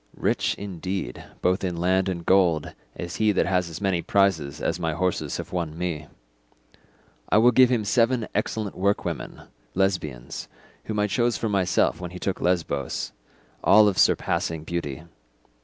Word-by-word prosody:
Rich, - - 0
indeed, 95 -1 -5 0.2
both 90 +2 +2
in 90 -2 -2
land 95 +2 +2
and 85 -2 -4
gold 90 -5 +3 0.2
is 85 0 -6
he 110 -1 +3
that - - +2
has 90 -2 +1
as 80 - -7
many 95 -4 0
prizes 85 -9 +1
as - - -1
my 80 -2 -1
horses 90 +2 -1
have - - -7
won 85 -3 -3
me. 85 -4 -3 1.2
I - - +4
will 120 +3 +6
give 125 +1 +6
him 120 -4 +1
seven 115 +2 +2
excellent 105 0 -2
workwomen, 100 +2 -2 0.3
Lesbians, 90 -10 -2 0.4
whom 110 - -3
I 105 - +3
chose 120 +3 +1
for 115 - -2
myself 95 -3 +1
when 90 - -4
he 90 - -9
took 95 - -2
Lesbos—all 85 - +1
of 100 -3 +1
surpassing 80 -2 +2
beauty. 80 -3 -4
90 Hz, 155 wpm, -25 LUFS, 85-100 Hz, 1.2 s, will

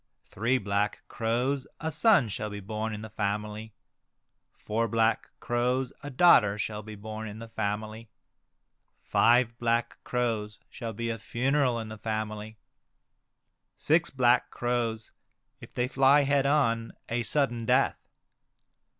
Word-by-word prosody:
Three 115 +8 0
black 100 -2 -1
crows, 125 +5 -1
a 160 +1 -3
son 165 - +4
shall 105 0 -4
be 105 0 -6
born 110 +2 -4
in 105 0 -6
the 110 - -7
family. 105 +1 -3 0.8
Four 115 +2 -1
black 115 +1 +1
crows, 125 +2 0
a 145 - -6
daughter 125 - +5
shall 105 +1 -3
be 110 0 -9
born 110 +1 -7
in 105 0 -8
the 115 0 -9
family. 110 +1 -4 0.9
Five 120 0 +3
black 115 0 0
crows 110 -4 -2
shall 115 -3 -6
be 115 +2 -3
a 115 - -5
funeral 130 +2 +1
in 110 -1 -5
the 110 -1 -9
family. 110 0 -4 1.2
Six 165 +3 +2
black 125 -2 +3
crows, 120 -2 -2 0.5
if - - -12
they 125 0 -1
fly 135 +2 +5
head 140 0 +2
on, 115 -6 +1
a 120 +1 -1
sudden 120 -3 0
death. - - +3
115 Hz, 135 wpm, -28 LUFS, 110-125 Hz, 1.2 s, daughter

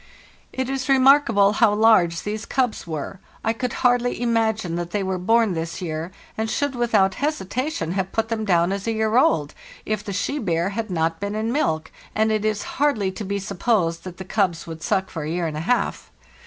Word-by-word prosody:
"It 260 -1 -2
is 270 0 -3
remarkable 260 -7 +5
how 215 -1 +4
large 185 -7 +4
these 215 +1 -4
cubs 250 -9 -1
were. 160 +4 -5 0.3
I 225 - +2
could 245 +2 -3
hardly 245 0 +3
imagine 220 -6 0
that 175 0 -3
they 205 +2 -1
were 190 -1 -2
born 225 +2 +3
this 165 +1 -4
year, 165 -2 -4 0.3
and 220 0 -2
should 285 +4 0
without 220 -6 +2
hesitation 255 - -2
have 190 0 -2
put 225 0 -1
them 225 -1 -1
down 175 -3 +2
as 200 +2 -3
a 225 - +1
year 220 0 0
old 160 - +3 0.3
if 215 -1 -2
the 205 - -5
she 240 +9 -1
bear 170 -4 0
had 220 +2 -4
not 165 -2 0
been 200 +1 -3
in 220 +2 -1
milk, 160 - 0 0.2
and 220 +1 +2
it 215 -1 0
is 215 -1 0 0.2
hardly 220 -10 +2
to 210 - -6
be 200 0 -2
supposed 195 -3 0
that 185 -1 -8
the 190 - -7
cubs 185 -4 0
would 160 -1 -8
suck 190 +4 0
for 160 - -5
a 150 - -4
year 170 +1 -1
and 155 -2 -3
a - - -2
half. 220 +10 -1
205 Hz, 210 wpm, -23 LUFS, 175-230 Hz, 0.3 s, remarkable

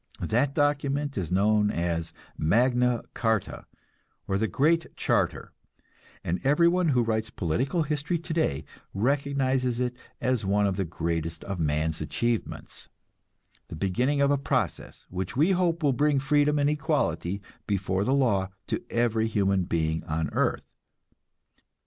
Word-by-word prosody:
That 135 +5 0
document 145 -1 0
is 90 -4 -3
known 105 +2 +3
as 85 -3 -2 0.2
Magna 125 +7 +2
Carta, 110 -4 -1 0.6
or 95 0 0
the 110 - +1
Great 160 - +2
Charter, - - 0 0.7
and 90 +2 -2
everyone 170 +5 +3
who 125 -5 +3
writes 110 -1 -1
political 130 - -1
history 150 +3 -1
today 160 - -1 0.3
recognizes 130 +1 +1
it 125 -1 -1 0.2
as 125 -4 0
one 100 +1 +2
of 100 -2 0
the 95 -1 -1
greatest 85 0 -3
of 95 -2 -5
man's 80 0 0
achievements, 115 +8 -3 0.8
the - - -8
beginning 125 - 0
of 140 0 +4
a 140 - +2
process - - -2
which 95 +5 -4
we 160 +7 +4
hope 175 -3 +1
will 140 -2 +3
bring 145 +3 +2
freedom 145 +2 +2
and 145 0 +2
equality 145 - -1 0.3
before 95 -1 0
the 130 - 0
law 100 -9 +2 0.2
to - - -3
every 115 -2 +1
human 100 -4 +1
being 80 -1 -1
on 80 +1 -2
earth. - - 0
120 Hz, 135 wpm, -27 LUFS, 95-145 Hz, 0.8 s, of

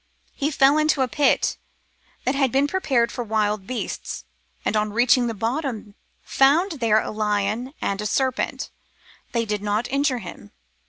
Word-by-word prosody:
He 290 0 -1
fell 280 0 +4
into 305 -3 +2
a - - 0
pit 285 +3 +2 0.7
that 260 - +2
had 275 -3 +1
been 270 +2 +3
prepared 270 -9 +1
for 245 - -4
wild 210 -3 -1
beasts, 240 -5 -5 0.4
and - - 0
on 210 0 +1
reaching 240 +2 +3
the 230 - -3
bottom 230 -1 -3 0.3
found 305 +8 +3
there 220 -2 +3
a - - -4
lion 215 +5 -1
and 200 +1 -1
a 210 - -1
serpent. 260 +3 -1 0.6
They 230 -1 0
did 210 -1 -2
not 210 +3 -1
injure 275 -1 +1
him. 175 - -10
240 Hz, 160 wpm, -23 LUFS, 210-275 Hz, 0.7 s, fell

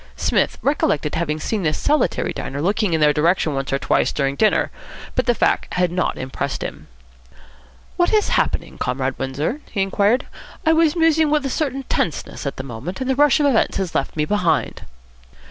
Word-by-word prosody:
Psmith - - 0
recollected 155 - +1
having 155 -2 -1
seen 215 +5 -2
this 155 -3 0
solitary 300 +1 +1
diner 140 - -5
looking 195 +3 +1
in 160 - +2
their 150 -1 +5
direction 160 0 +2
once 135 0 -3
or 135 - +2
twice - - +1
during 140 -1 -1
dinner, 215 +7 +2 0.4
but - - -1
the 240 - +3
fact - - 0
had 180 -1 +1
not 180 +1 -1
impressed 135 +1 -4
him. - - -7 1.1
"What 350 - +2
is 430 -1 +2
happening, - - -1
Comrade 130 +1 -2
Windsor?" 140 - -2
he 195 - 0
inquired. 205 +6 +1 0.4
"I 320 - +5
was 320 -1 +3
musing 320 -2 +3
with 300 -1 +1
a 270 - -1
certain 275 -2 -2
tenseness 160 - -2
at 140 - -4
the 130 - -5
moment, 135 +8 -6
and 260 - -3
the 265 - +1
rush 290 0 +4
of 295 - +2
events 270 -6 +2
has 190 -3 -2
left 135 - -1
me 150 - +1
behind." 175 -5 0
180 Hz, 190 wpm, -21 LUFS, -, 1.1 s, their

